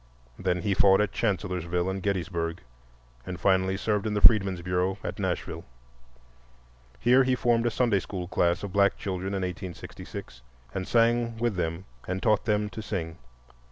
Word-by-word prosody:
Then 90 Hz, -2 st, -1 dB
he 100 Hz, -, +1 dB
fought 95 Hz, 0 st, +5 dB
at 105 Hz, -1 st, +1 dB
Chancellorsville 90 Hz, -4 st, -1 dB
and 95 Hz, 0 st, -2 dB
Gettysburg 85 Hz, -3 st, -2 dB, 0.6 s
and 90 Hz, +5 st, -6 dB
finally 95 Hz, 0 st, +2 dB
served 105 Hz, 0 st, 0 dB
in 105 Hz, -, -1 dB
the -, -, +2 dB
Freedmen's 95 Hz, -5 st, +5 dB
Bureau 90 Hz, +2 st, 0 dB
at -, -, -5 dB
Nashville. -, -, -3 dB, 1.4 s
Here 125 Hz, +3 st, +5 dB
he 130 Hz, 0 st, +2 dB
formed 120 Hz, -1 st, +2 dB
a -, -, +3 dB
Sunday 115 Hz, -4 st, +2 dB
school 90 Hz, -1 st, -6 dB
class 85 Hz, +2 st, +1 dB
of 100 Hz, -3 st, -5 dB
black 100 Hz, 0 st, +3 dB
children 95 Hz, 0 st, -3 dB
in 95 Hz, -, -2 dB
1866, 90 Hz, -8 st, -7 dB, 0.3 s
and 95 Hz, -1 st, -3 dB
sang 115 Hz, 0 st, +2 dB
with 115 Hz, -2 st, 0 dB
them 85 Hz, +1 st, -2 dB, 0.2 s
and 95 Hz, +1 st, -3 dB
taught 110 Hz, -2 st, +2 dB
them 105 Hz, -1 st, +1 dB
to 110 Hz, -, -6 dB
sing. 85 Hz, -6 st, -4 dB
95 Hz, 160 wpm, -27 LUFS, 90-105 Hz, 1.4 s, fought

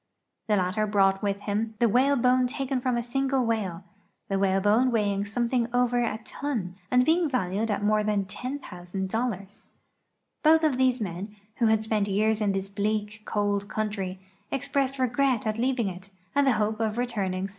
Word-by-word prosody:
The 210 Hz, -, +3 dB
latter 195 Hz, +3 st, 0 dB
brought 195 Hz, -2 st, +3 dB
with 200 Hz, -1 st, -1 dB
him 215 Hz, +2 st, -2 dB
the 235 Hz, +1 st, +3 dB
whalebone 255 Hz, +1 st, +3 dB
taken 265 Hz, 0 st, -2 dB
from 250 Hz, -1 st, 0 dB
a 235 Hz, -, -1 dB
single 270 Hz, +1 st, 0 dB
whale, 200 Hz, -6 st, -2 dB, 0.5 s
the 195 Hz, -1 st, 0 dB
whalebone 205 Hz, +6 st, +3 dB
weighing 205 Hz, -4 st, 0 dB
something 235 Hz, +2 st, 0 dB
over 245 Hz, 0 st, +2 dB
a 225 Hz, -, -1 dB
ton 230 Hz, -11 st, -3 dB, 0.2 s
and 250 Hz, 0 st, +4 dB
being 330 Hz, 0 st, +3 dB
valued 220 Hz, -3 st, -1 dB
at 205 Hz, -1 st, -1 dB
more 210 Hz, 0 st, +3 dB
than 210 Hz, -2 st, 0 dB
$10,()0(). 190 Hz, -5 st, -5 dB, 1.4 s
lioth 320 Hz, +1 st, +5 dB
of 295 Hz, -5 st, +2 dB
these 255 Hz, -2 st, +3 dB
men, 200 Hz, +2 st, -5 dB, 0.2 s
who 235 Hz, -, +3 dB
had 220 Hz, 0 st, +3 dB
spent 215 Hz, -2 st, 0 dB
years 215 Hz, +2 st, +1 dB
in 205 Hz, -1 st, +2 dB
this 195 Hz, 0 st, -2 dB
bleak, 210 Hz, +1 st, -2 dB
cold 205 Hz, -1 st, 0 dB
country, 200 Hz, -4 st, -3 dB, 0.3 s
expressed 275 Hz, 0 st, -1 dB
re 255 Hz, -1 st, +2 dB
gret 250 Hz, -1 st, +1 dB
at 215 Hz, +1 st, -1 dB
leaving 250 Hz, -3 st, +1 dB
it 185 Hz, +1 st, -7 dB, 0.2 s
and 285 Hz, 0 st, +3 dB
the 265 Hz, -, +5 dB
hope 215 Hz, 0 st, 0 dB
of 220 Hz, -1 st, 0 dB
soon -, -, -3 dB
returning. 195 Hz, -6 st, -2 dB
220 Hz, 175 wpm, -27 LUFS, 200-250 Hz, 1.4 s, lioth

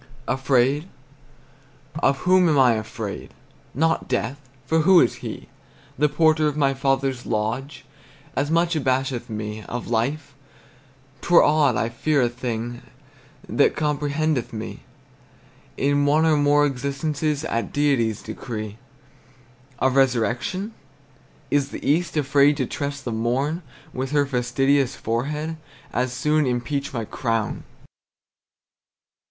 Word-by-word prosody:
Afraid? 135 Hz, +4 st, +1 dB, 1.1 s
Of 135 Hz, -, +2 dB
whom 180 Hz, -1 st, +5 dB
am 150 Hz, -, +3 dB
I 130 Hz, -3 st, +6 dB
afraid? 110 Hz, -1 st, -5 dB, 0.4 s
Not 160 Hz, +4 st, +1 dB
death; 125 Hz, +3 st, -2 dB, 0.3 s
for 160 Hz, +5 st, +2 dB
who 175 Hz, +3 st, +6 dB
is -, -, +2 dB
he? -, -, -7 dB, 0.5 s
The 150 Hz, +3 st, +2 dB
porter 155 Hz, +1 st, +3 dB
of 150 Hz, 0 st, -2 dB
my 140 Hz, -2 st, +2 dB
father's 135 Hz, -1 st, -1 dB
lodge 115 Hz, +6 st, -3 dB, 0.5 s
As 145 Hz, +1 st, 0 dB
much 170 Hz, +1 st, +2 dB
abasheth 130 Hz, -3 st, -1 dB
me. 105 Hz, 0 st, -5 dB
Of 120 Hz, -1 st, -5 dB
life? 140 Hz, +6 st, -1 dB, 0.9 s
'T -, -, -6 dB
were 175 Hz, -, +8 dB
odd 150 Hz, -5 st, +3 dB
I 115 Hz, -, 0 dB
fear 145 Hz, +5 st, 0 dB
a 120 Hz, -, +2 dB
thing 120 Hz, 0 st, -4 dB, 0.7 s
That 145 Hz, -, +2 dB
comprehendeth 150 Hz, -2 st, -1 dB
me 110 Hz, -1 st, -6 dB, 1.0 s
In 145 Hz, +1 st, +2 dB
one 155 Hz, +3 st, +4 dB
or 160 Hz, -1 st, +4 dB
more 145 Hz, 0 st, +4 dB
existences 145 Hz, +3 st, -2 dB
At 115 Hz, -6 st, -2 dB
Deity's 130 Hz, -7 st, +1 dB
decree. 110 Hz, -1 st, -6 dB, 1.0 s
Of 130 Hz, -1 st, +1 dB
resurrection? 135 Hz, -, +1 dB, 0.8 s
Is 140 Hz, -1 st, +2 dB
the -, -, -6 dB
east 160 Hz, +2 st, +1 dB
Afraid 145 Hz, 0 st, +4 dB
to 130 Hz, -, 0 dB
trust 140 Hz, +2 st, -5 dB
the 120 Hz, -, -2 dB
morn 130 Hz, +9 st, -1 dB, 0.3 s
With 130 Hz, +1 st, -3 dB
her 145 Hz, -1 st, +3 dB
fastidious 135 Hz, +1 st, +1 dB
forehead? 150 Hz, +8 st, -3 dB, 0.4 s
As 125 Hz, +1 st, 0 dB
soon 150 Hz, +3 st, +1 dB
impeach 130 Hz, +3 st, -2 dB
my 115 Hz, -3 st, -3 dB
crown! 115 Hz, -1 st, -2 dB
135 Hz, 125 wpm, -23 LUFS, 120-150 Hz, 1.1 s, were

